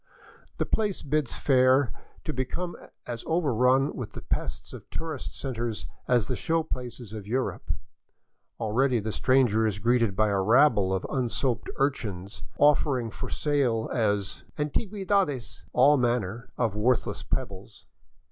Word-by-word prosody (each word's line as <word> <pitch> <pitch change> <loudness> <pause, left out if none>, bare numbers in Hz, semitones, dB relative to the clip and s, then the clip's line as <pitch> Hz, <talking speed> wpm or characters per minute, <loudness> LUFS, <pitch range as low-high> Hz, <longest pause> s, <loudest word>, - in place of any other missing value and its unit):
The - - 0
place 210 -3 0
bids 145 -2 -1
fair 130 -1 +4 0.3
to - - -3
become 170 +8 -3 0.3
as 120 -1 -5
overrun 135 -4 +2
with 125 - -6
the - - -8
pests - - -3
of - - -10
tourist 160 -4 -5
centers 120 -4 -3 0.2
as 120 -4 +3
the 125 - -1
show 165 +6 0
places 125 -6 -6
of 105 -2 -7
Europe. 130 +4 -2 0.9
Already 120 +3 +2
the 110 +1 -3
stranger 120 -3 +3
is 105 -2 -1
greeted 115 -1 +2
by 110 +2 +3
a 100 -1 +1
rabble 110 -2 +4
of 95 -1 -1
unsoaped 125 -1 -1
urchins, 105 -8 -2 0.2
offering 140 -5 +3
for - - -6
sale 135 -7 0
as 105 -5 0
'' - - -30
antigiiedades 185 - -1
" - - -29
all 140 +4 +5
manner 120 -2 -1
of 115 -4 0
worthless 115 +3 +1
pebbles. 100 +1 -5
125 Hz, 140 wpm, -27 LUFS, 110-140 Hz, 0.9 s, all